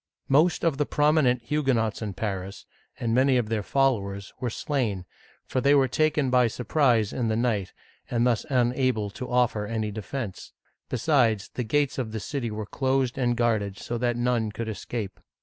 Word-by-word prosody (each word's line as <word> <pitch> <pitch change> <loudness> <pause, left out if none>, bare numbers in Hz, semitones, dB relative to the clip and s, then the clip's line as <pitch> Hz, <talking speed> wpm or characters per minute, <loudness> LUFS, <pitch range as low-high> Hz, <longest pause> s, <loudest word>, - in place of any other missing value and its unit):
Most 155 +6 +3
of 160 -5 +2
the 150 - +1
prominent 145 -5 +3
Hugue 135 0 +1
nots 115 -1 -1
in 105 -3 -4
Paris, 95 -1 -4 0.3
and 115 -1 -1
many 130 +1 +4
of 115 -3 -1
their 110 -2 0
followers, 100 -6 0
were 125 - -1
slain, 115 - -2 0.4
for 130 - -1
they 140 +2 +5
were 135 -2 +4
taken 150 0 +1
by 125 -1 +5
surprise 120 -2 +1
in 120 -3 -1
the 110 - +1
night, 110 -5 0 0.4
and 120 0 +1
thus 120 -3 +2
unable 125 -4 +1
to 125 +4 -7
offer 120 -4 +1
any 110 -1 -2
defense; 110 0 -6 0.4
besides, 120 -5 +2
the 125 - -2
gates 145 +3 0
of 110 -4 -3
the 110 - -2
city 120 +3 -3
were 105 0 -4
closed 130 +2 0
and 120 -3 0
guarded 110 -5 0
so 120 0 -4
that 120 -1 0
none 120 -3 0
could 115 +2 -5
escape. 105 0 -5
120 Hz, 180 wpm, -26 LUFS, 110-135 Hz, 0.4 s, they